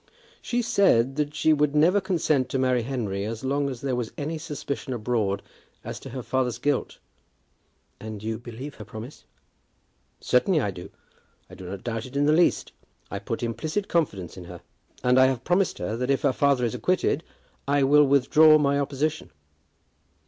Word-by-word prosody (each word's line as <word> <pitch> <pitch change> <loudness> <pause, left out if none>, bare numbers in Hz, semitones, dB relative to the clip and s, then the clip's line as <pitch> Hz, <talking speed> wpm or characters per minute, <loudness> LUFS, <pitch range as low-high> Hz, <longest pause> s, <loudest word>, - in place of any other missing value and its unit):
"She 245 0 -1
said 135 - +3
that 150 0 -1
she 155 +1 +3
would 150 -1 +1
never 175 +7 +4
consent 155 -8 0
to 135 - -1
marry 130 -2 +2
Henry 110 -6 -3
as 110 +2 -5
long 140 +1 0
as 130 -3 -7
there 135 -2 -1
was 120 -3 -3
any 155 +2 -3
suspicion 145 -3 -5
abroad 110 -4 -1 0.4
as - - -6
to - - -10
her 130 -2 -6
father's 130 -2 -1
guilt." 145 -2 -1 1.0
"And 110 -1 -8
you 110 0 -3
believe 125 +4 -8
her 110 - -10
promise?" 110 +6 -10 0.9
"Certainly 155 +7 +2
I 105 -8 -1
do; 90 -1 -9 0.6
I - - -12
do 90 -1 -9
not 95 0 -7
doubt 115 0 -4
it 130 - -14
in 145 +1 +2
the 150 - +4
least. 170 +2 +2 0.4
I 100 - -3
put 115 +4 -4
implicit 155 - -2
confidence 100 - -1
in 90 - -9
her. 85 -1 -10 0.4
And 125 +1 +4
I 130 - +7
have 130 -2 -2
promised 180 +4 +1
her 105 +5 -3
that 125 +2 -3
if 140 - +1
her 140 -3 +3
father 140 -2 +2
is 115 - -2
acquitted, 180 -4 0 0.4
I 140 0 +3
will 145 +2 +6
withdraw 155 +3 +6
my 140 -1 +2
opposition." 145 - -2
135 Hz, 180 wpm, -25 LUFS, 115-150 Hz, 1.0 s, I